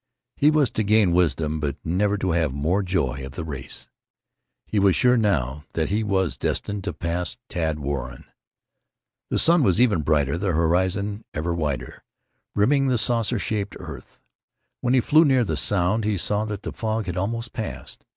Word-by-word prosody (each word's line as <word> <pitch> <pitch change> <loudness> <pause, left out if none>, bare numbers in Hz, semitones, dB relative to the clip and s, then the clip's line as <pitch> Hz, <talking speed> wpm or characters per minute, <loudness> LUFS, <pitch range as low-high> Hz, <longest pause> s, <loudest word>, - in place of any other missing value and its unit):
He 145 - +4
was 155 -5 +2
to 110 - -1
gain 105 -2 +3
wisdom, 80 -3 +1
but 75 -3 -2
never 100 +5 +1
to 95 -2 -1
have 80 -4 +1
more 80 +9 0
joy 75 -9 -1
of 65 0 -8
the 80 - -5
race. 70 -4 -7 0.8
He 105 - -1
was 95 -2 +4
sure 125 0 +4
now 75 - 0
that 80 -1 -1
he 105 +3 0
was 95 -3 0
destined 100 -1 -2
to - - -2
pass 85 +6 -3
Tad 80 -3 -1
Warren. 70 -3 -5 1.0
The - - 0
sun 170 0 +5
was 100 -5 +3
ever 115 -8 +4
brighter; 75 0 +1
the 95 -2 0
horizon 95 +6 0
ever 85 +3 -1
wider, 75 -6 -3 0.5
rimming 135 +7 +3
the 125 -2 +2
saucer 115 +1 +2
shaped 100 +1 -3
earth. - - -10 0.6
When 125 +1 +1
he 130 - +4
flew 155 +6 +5
near 135 -5 +3
the 80 - -2
Sound 90 - +1
he 105 -1 0
saw 105 +4 +1
that 105 -1 -5
the - - -5
fog 110 -1 -2
had 90 -2 -4
almost 115 +5 -3
passed. 65 - -6
95 Hz, 180 wpm, -24 LUFS, 80-110 Hz, 1.0 s, sun